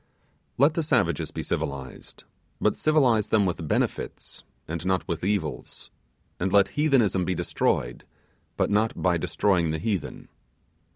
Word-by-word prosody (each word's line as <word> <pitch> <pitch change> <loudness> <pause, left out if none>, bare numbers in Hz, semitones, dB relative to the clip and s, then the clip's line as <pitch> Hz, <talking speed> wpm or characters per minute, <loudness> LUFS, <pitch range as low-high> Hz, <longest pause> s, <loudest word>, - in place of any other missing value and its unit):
Let 145 +4 +4
the 165 - 0
savages 125 - +1
be - - -5
civilized, 70 -2 -5 0.4
but - - +2
civilize 130 -9 +2
them 105 -2 +3
with 85 -3 -3
benefits, - - -3 0.2
and 80 0 -4
not 95 0 0
with 85 -1 -3
evils; 100 +1 -3 0.5
and 95 +1 -1
let 100 -1 +4
heathenism 125 - +2
be 90 +1 -1
destroyed, - - -1 0.5
but - - +1
not 110 +2 +1
by 90 -2 +2
destroying 85 0 +1
the 80 - -1
heathen. 95 +1 -4
95 Hz, 135 wpm, -26 LUFS, 85-115 Hz, 0.5 s, Let